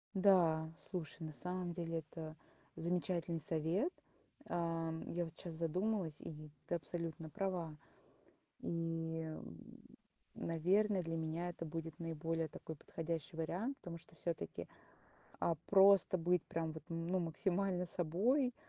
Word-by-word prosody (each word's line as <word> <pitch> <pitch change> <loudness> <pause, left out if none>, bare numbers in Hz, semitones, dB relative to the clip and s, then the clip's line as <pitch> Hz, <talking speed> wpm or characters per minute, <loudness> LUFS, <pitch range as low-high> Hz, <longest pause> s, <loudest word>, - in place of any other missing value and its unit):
Да, 170 -5 +6 0.2
слушай, 175 -5 -3
на 155 -1 -4
самом 180 -1 -1
деле 165 -1 -1
это 155 0 -7 0.4
замечательный 170 -1 0
совет. 165 - +2 0.5
Ам, 165 -1 0
я 175 0 0
вот 160 - -8
щас 175 - -6
задумалась, 180 +2 +1
и - - -5
ведь 150 -1 -9
ты - - +1
абсолютно 165 -1 -3
права. 180 -4 -1 0.9
И, 165 -1 -1
м, 155 - -6 0.8
наверно, 185 +4 +3
для 165 0 -1
меня 165 +2 -1
это 170 - -5
будет 165 -1 -4
наиболее 165 0 -1
такой 160 - -6
подходящий 165 +2 -3
вариант, 185 - -1
потому 170 -1 -6
что 165 - -19
всё-таки, 165 - -3 0.7
а, 170 - +3
просто 195 -1 +7
быть 175 0 +3
прям 160 -1 -1
вот, 160 - -8
ну, 170 +2 0
максимально 180 +2 +1
собой, 225 - +2
165 Hz, 130 wpm, -39 LUFS, 160-180 Hz, 0.9 s, просто